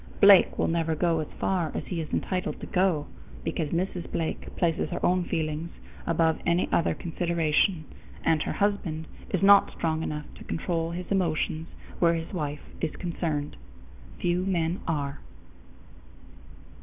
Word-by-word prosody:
Blake 200 -2 +7
will - - +2
never 165 -1 +1
go 165 0 +2
as 155 - -3
far 175 -5 0
as - - -3
he 170 -3 -3
is 155 - -7
entitled 185 -1 -1
to - - -6
go, 180 -5 +1 0.4
because 155 -3 -2
Mrs. 175 +1 -2
Blake 165 -1 -2
places 170 -2 +1
her 175 - -2
own 180 0 +2
feelings 160 -1 -2 0.4
above 165 -1 +2
any 170 +1 +2
other 165 - +2
consideration, 170 0 +1 0.4
and 160 -2 +3
her - - -1
husband 200 -6 0 0.2
is 190 0 0
not 200 0 +7
strong 160 -1 -1
enough 150 -1 -3
to - - -9
control 165 -1 -2
his 175 +2 -4
emotions 165 -3 0 0.3
where 170 -1 +4
his 165 +4 -5
wife 150 -4 -3 0.2
is 160 - -1
concerned. 160 -4 -2 0.6
Few 175 +1 +1
men 175 -2 0
are. 145 -3 -2
165 Hz, 150 wpm, -27 LUFS, 160-180 Hz, 0.6 s, Blake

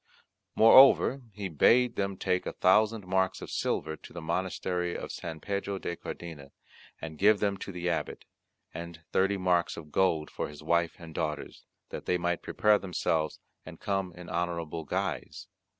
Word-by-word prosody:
Moreover 135 +3 +7
he 100 -1 -5
bade 115 - +4
them 100 -1 -2
take 90 0 -1
a - - -3
thousand 105 +2 +3
marks 95 0 +1
of - - -8
silver 80 0 -1
to - - -14
the 85 - -6
monastery 90 +1 -2
of - - -6
St. 80 -2 -6
Pedro 100 0 -2
de 85 - -4
Cardena, 80 -5 -8 0.5
and 80 -2 -8
give 105 +1 +5
them 100 -1 +1
to 95 - -7
the 90 -1 -4
Abbot, 85 -2 -2 0.5
and 85 -1 -8
thirty 95 +1 +2
marks 90 -2 +1
of 75 -2 -10
gold 80 -4 +1
for - - -3
his 75 +1 -11
wife 85 +1 +1
and 80 -2 -11
daughters, 75 -1 -4 0.2
that - - -7
they 90 - +2
might 85 0 -1
prepare 105 -1 +3
themselves 80 -4 -1 0.2
and - - -11
come 95 -2 -2
in 90 0 -10
honourable 85 -2 -3
guise. - - -3
90 Hz, 165 wpm, -29 LUFS, 85-100 Hz, 0.5 s, Moreover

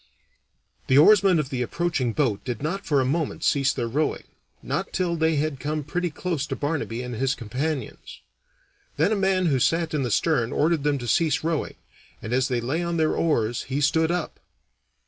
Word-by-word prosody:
The 130 - +4
oarsmen 195 +3 +6
of 150 -4 -2
the 130 -2 -2
approaching 135 -2 -1
boat 115 -6 0
did 125 -1 -5
not 195 +6 -3
for 145 -3 +3
a - - 0
moment 155 +3 -2
cease 135 -1 +3
their 120 -3 -3
rowing, 150 +6 -1 0.4
not 150 +9 -3
till 180 -2 0
they 160 0 +1
had 145 -2 -1
come 150 +2 -3
pretty 175 +5 -2
close 160 -2 -3
to 135 - -3
Barnaby 145 -6 -3
and 125 0 -6
his 135 +4 0
companions. 135 +5 -4 0.8
Then - - +2
a - - +2
man 190 -2 +1
who 140 -6 +2
sat 165 +5 +1
in 150 - 0
the 125 - -1
stern 125 0 +1
ordered 160 0 +1
them 145 -1 +1
to 120 -2 -6
cease 155 +4 +2
rowing, 165 -1 -2 0.4
and 110 - -5
as 130 +1 +2
they 125 -3 -1
lay 140 +8 -1
on 170 -1 -2
their 160 -1 +1
oars 120 -8 0
he 135 +2 -1
stood 160 +3 +2
up. 175 -1 -3
150 Hz, 195 wpm, -24 LUFS, 130-165 Hz, 0.8 s, oarsmen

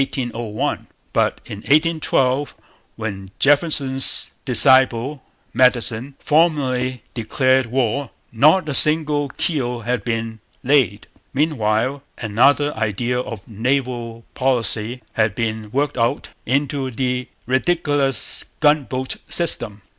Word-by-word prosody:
But - - 0
in 100 - -8
1812, 145 -2 +1 0.4
when 100 -4 -6
Jefferson's 140 -2 +3
disciple, 130 +1 +4 0.3
Madison, 125 +1 +2
formally 130 -6 0
declared 130 +2 +1
war, 130 +2 -1 0.2
not 155 +9 +3
a 150 - -2
single 150 -1 +4
keel 125 -5 -2
had 120 -1 -2
been 115 -1 -4 0.2
laid. 125 -7 +1 0.3
Meanwhile, 130 -2 0 0.2
another 135 +7 +2
idea 120 +3 -2
of 115 -5 -7
naval 120 0 -3
policy 125 -2 -1
had 110 -2 0
been 110 -2 -3
worked 140 +3 -2
out 115 +1 -1 0.2
into 135 +1 -1
the 125 0 -3 0.2
ridiculous 140 -1 +1 0.2
gunboat 140 -4 0
system. 110 - 0
130 Hz, 95 wpm, -20 LUFS, 115-145 Hz, 0.4 s, disciple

